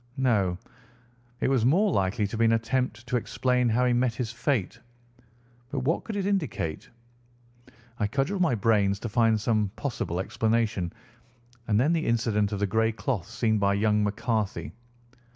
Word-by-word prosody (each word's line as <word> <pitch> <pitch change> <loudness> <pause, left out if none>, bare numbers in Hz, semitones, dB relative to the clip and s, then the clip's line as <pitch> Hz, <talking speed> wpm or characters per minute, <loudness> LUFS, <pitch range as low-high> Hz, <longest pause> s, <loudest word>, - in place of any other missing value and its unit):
No, 105 -9 +1 0.8
it - - +2
was 130 -4 +2
more 185 - +3
likely 100 - +1
to 105 - -4
be 115 +1 +2
an 115 - +4
attempt 115 0 -1
to 125 +1 0
explain 125 +1 0
how 125 +3 +2
he 125 - +3
met 120 -1 +1
his 120 -3 -3
fate. 120 -4 -1 0.9
But 135 -1 -3
what 150 +6 0
could 220 - -5
it 200 -2 -1
indicate? 160 - -2 1.1
I 105 - +1
cudgelled 140 - -1
my 160 -9 +3
brains 100 -2 +2
to 120 - -4
find 115 -1 +3
some 105 -1 +1
possible 115 -10 -3
explanation. 110 -3 0 0.8
And 105 -2 +2
then 145 +7 +3
the 165 -1 0
incident 110 -3 +1
of 105 - -2
the 100 - +1
grey 110 +3 +1
cloth 115 - -3
seen 110 -2 0
by 100 0 +2
young 105 0 +2
McCarthy. 105 - -2
115 Hz, 165 wpm, -27 LUFS, 105-125 Hz, 1.1 s, an